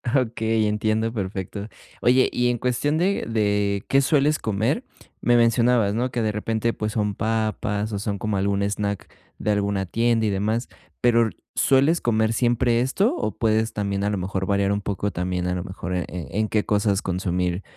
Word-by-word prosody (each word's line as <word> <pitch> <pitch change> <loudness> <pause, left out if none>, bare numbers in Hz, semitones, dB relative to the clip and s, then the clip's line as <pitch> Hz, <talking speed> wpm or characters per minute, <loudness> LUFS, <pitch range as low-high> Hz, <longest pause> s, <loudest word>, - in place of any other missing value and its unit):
Okey, 110 -3 +1
entiendo 110 +1 0
perfecto, 100 -1 -4 0.3
oye, 130 +1 +4
y 125 0 +1
en 120 - 0
cuestión 125 +5 0
de 190 +4 +1
de 105 -3 0
qué 135 - +5
sueles 150 +1 +2
comer, 110 - 0 0.4
me 120 - +3
mencionabas, 115 -2 +3
¿no?, 125 +2 -1
que 120 - -1
de 110 -1 +1
repente, 110 +2 -1
pues, 105 0 -3
son 105 -2 0
papas, 110 -1 -1
o 100 - -2
son 100 -1 -2
como 105 0 -1
algún 100 +1 0
snack 100 0 -2 0.3
de 105 - 0
alguna 100 -1 0
tienda 115 +4 +1
y - - +2
demás, 105 +5 -1 0.3
pero, 115 -2 +4 0.3
¿sueles 140 +6 +3
comer 110 -1 +1
siempre 120 0 +2
esto 195 - +1
o 110 - -2
puedes 110 0 +1
también, 100 -1 -2
a 105 - +1
lo 105 - -1
mejor, 95 +1 -2
variar 100 0 +1
un 100 0 0
poco 100 +1 -2
también, 90 0 -2
a 90 - -1
lo 90 - -3
mejor, 95 -2 -6
eh, 90 - -1
en 90 +5 -3
qué 105 0 +1
cosas 100 -1 +1
consumir 90 0 -1
110 Hz, 180 wpm, -23 LUFS, 100-115 Hz, 0.4 s, qué